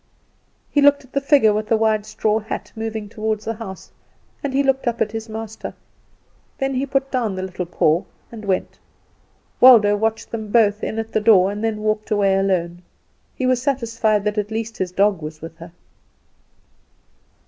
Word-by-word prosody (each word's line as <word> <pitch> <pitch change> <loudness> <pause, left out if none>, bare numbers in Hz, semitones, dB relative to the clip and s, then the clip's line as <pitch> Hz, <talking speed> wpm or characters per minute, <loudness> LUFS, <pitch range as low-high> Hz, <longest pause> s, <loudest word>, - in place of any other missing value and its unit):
He 290 - +3
looked 285 0 +5
at 255 - -25
the 275 - +1
figure 275 -7 +4
with 215 +1 -2
the 225 - +3
wide 215 -1 +1
straw 215 0 0
hat 220 +1 -6
moving 220 -1 -4
toward 215 0 -3
the 225 +1 -3
house, 210 -4 -9 0.5
and 285 - -2
he 275 +2 +2
looked 270 -2 0
up 235 -1 -1
at 210 - 0
his 225 0 -6
master; 220 0 -7 0.8
then 270 0 -1
he 265 +2 -1
put 270 0 -1
down 230 -7 -1
the 185 - -4
little 185 -1 -5
paw 170 +2 +1 0.3
and 225 -2 -9
went. 190 -2 -2 0.8
Waldo 220 -5 +7
watched 220 +1 -2
them 220 -2 -5
both 210 -3 +3
in 220 - -3
at 225 0 -4
the 220 - 0
door 200 -3 +5
and 205 +2 -5
then 215 -1 -2
walked 215 0 -1
away 200 -3 +2
alone. 180 -3 0 0.5
He 260 - -2
was 255 -1 +2
satisfied 230 -6 0
that 210 0 -1
at 210 0 -3
least 225 0 -4
his 185 -1 -2
dog 195 -1 +2
was 155 0 -7
with 165 +1 -9
her. 170 +1 -10
215 Hz, 185 wpm, -21 LUFS, 205-230 Hz, 0.8 s, Waldo